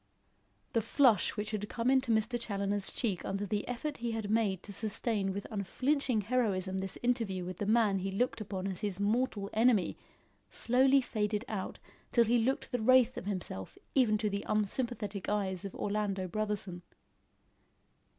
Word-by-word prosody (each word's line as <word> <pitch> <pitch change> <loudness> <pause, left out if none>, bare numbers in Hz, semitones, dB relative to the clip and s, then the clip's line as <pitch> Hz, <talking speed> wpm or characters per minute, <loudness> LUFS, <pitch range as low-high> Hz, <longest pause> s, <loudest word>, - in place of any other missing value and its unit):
The 230 - +3
flush 230 -2 +3
which 210 0 -2
had 210 -1 -3
come 235 +2 +1
into 265 -2 +3
Mr. 230 +2 +1
Challoner's 200 -2 -1
cheek 200 -7 -1
under 195 +1 -2
the 205 +1 -2
effort 280 +4 -3
he 235 -1 -3
had 220 -2 -3
made 205 -5 +1
to 205 - -9
sustain 205 -1 -1
with 200 +1 -4
unflinching 250 +4 0
heroism 200 -5 0
this 190 0 -3
interview 225 -7 0
with 180 -1 -6
the 205 - -2
man 215 -3 +3
he 195 +1 -2
looked 220 +4 -1
upon 195 -2 -4
as 190 -1 -1
his 200 -3 -1
mortal 205 -1 0
enemy, 225 -3 +3 0.5
slowly 260 +3 +4
faded 210 -2 -1
out 200 -4 -4 0.3
till 235 - +5
he 235 +2 +3
looked 265 +3 -1
the 245 -3 -1
wraith 255 +1 +5
of - - -6
himself 180 - -4 0.2
even 235 -6 +4
to 210 - -1
the 200 0 -2
unsympathetic 215 -1 -1
eyes 195 -3 -1
of 195 - -6
Orlando 200 -2 -1
Brotherson. 200 -2 -2
210 Hz, 165 wpm, -32 LUFS, 195-235 Hz, 0.5 s, till